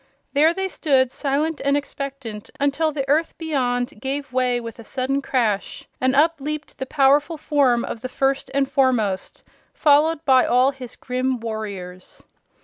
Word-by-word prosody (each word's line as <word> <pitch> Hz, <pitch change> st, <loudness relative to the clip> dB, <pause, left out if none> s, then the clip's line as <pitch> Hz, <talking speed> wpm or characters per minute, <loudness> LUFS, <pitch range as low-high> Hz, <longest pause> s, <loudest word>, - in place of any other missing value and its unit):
There 300 Hz, +3 st, +5 dB
they 385 Hz, +2 st, -2 dB
stood 265 Hz, -8 st, +1 dB
silent 295 Hz, +4 st, -1 dB
and 280 Hz, +1 st, +2 dB
expectant 275 Hz, -7 st, -6 dB
until 285 Hz, +3 st, +1 dB
the 275 Hz, -2 st, -3 dB
earth 310 Hz, +4 st, +1 dB
beyond 260 Hz, -4 st, -2 dB
gave 275 Hz, 0 st, -4 dB
way 250 Hz, -1 st, +1 dB
with 230 Hz, 0 st, -8 dB
a -, -, -9 dB
sudden 265 Hz, +4 st, -2 dB
crash 225 Hz, -7 st, -1 dB
and 260 Hz, +1 st, +2 dB
up 320 Hz, +3 st, +4 dB
leaped 305 Hz, +1 st, -5 dB
the 265 Hz, -, -4 dB
powerful 290 Hz, +4 st, +3 dB
form 275 Hz, -5 st, +2 dB
of 225 Hz, -, -6 dB
the 255 Hz, -, -5 dB
First 270 Hz, +1 st, 0 dB
and 275 Hz, -1 st, +2 dB
Foremost, 240 Hz, -9 st, 0 dB, 0.3 s
followed 305 Hz, +1 st, +3 dB
by 260 Hz, -2 st, +5 dB
all 250 Hz, +3 st, +3 dB
his 255 Hz, -3 st, -10 dB
grim 255 Hz, 0 st, -2 dB
warriors. 200 Hz, -5 st, -7 dB
270 Hz, 155 wpm, -22 LUFS, 245-290 Hz, 0.3 s, There